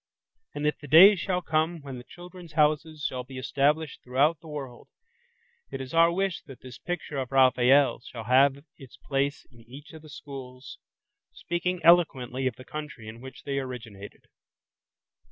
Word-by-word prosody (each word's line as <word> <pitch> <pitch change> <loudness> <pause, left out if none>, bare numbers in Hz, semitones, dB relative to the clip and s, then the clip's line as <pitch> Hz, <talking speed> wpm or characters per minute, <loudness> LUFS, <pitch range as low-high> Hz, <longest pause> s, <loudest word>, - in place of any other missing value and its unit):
And 145 - -3
if 150 - 0
the 145 - -11
day 185 +8 +9
shall 180 -1 -2
come 160 +1 0
when 135 -3 -7
the - - -11
"Children's 175 +1 -13
Houses" 155 0 +1
shall 125 -1 -5
be 130 +1 -11
established 145 +3 0
throughout 140 +6 +1
the 160 - -15
world, 135 -5 -8 0.8
it - - -6
is 130 +2 -7
our 165 +1 +5
wish 190 0 -2
that 135 -3 -12
this 130 -2 -11
picture 175 -4 -5
of 130 -1 -5
Raphael's 130 0 +4
shall 115 -2 -8
have 135 +4 +3
its 135 -3 -14
place 140 +1 -2
in 120 - -19
each 145 +5 -12
of 160 - -11
the 155 - -15
schools, 135 -3 -10 0.5
speaking 175 +1 -3
eloquently 135 -7 +3
of 125 - -3
the 130 - -13
country 150 -7 -8
in 115 +2 -10
which 130 0 -11
they 140 -1 -2
originated. 115 -6 -9
140 Hz, 170 wpm, -27 LUFS, 130-160 Hz, 0.8 s, day